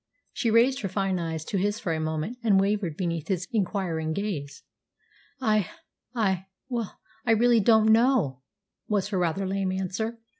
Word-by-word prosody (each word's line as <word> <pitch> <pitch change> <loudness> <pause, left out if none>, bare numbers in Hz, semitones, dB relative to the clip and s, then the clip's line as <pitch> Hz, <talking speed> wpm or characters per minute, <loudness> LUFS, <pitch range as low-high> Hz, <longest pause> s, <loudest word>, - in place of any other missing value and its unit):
She 230 - 0
raised 240 +4 +4
her 195 - -2
fine 190 -1 0
eyes 160 -2 -3
to 195 - -1
his 205 +3 0
for 175 -7 -2
a 160 - -2
moment, 160 +9 -3
and 205 -4 +4
wavered 195 -5 0
beneath 170 -4 -2
his 180 -2 -1
inquiring 180 -6 -1
gaze. 160 -8 -4 0.8
"I 215 -7 +1 0.5
I 190 -5 0 0.2
well, 235 -5 -3 0.3
I 235 -3 +3
really 235 +1 +4
don't 220 +1 +5
know," 225 - +3 0.5
was 205 -2 0
her 195 -3 -1
rather 180 +3 0
lame 190 0 -1
answer. 190 +5 -3
195 Hz, 160 wpm, -26 LUFS, 175-220 Hz, 0.8 s, don't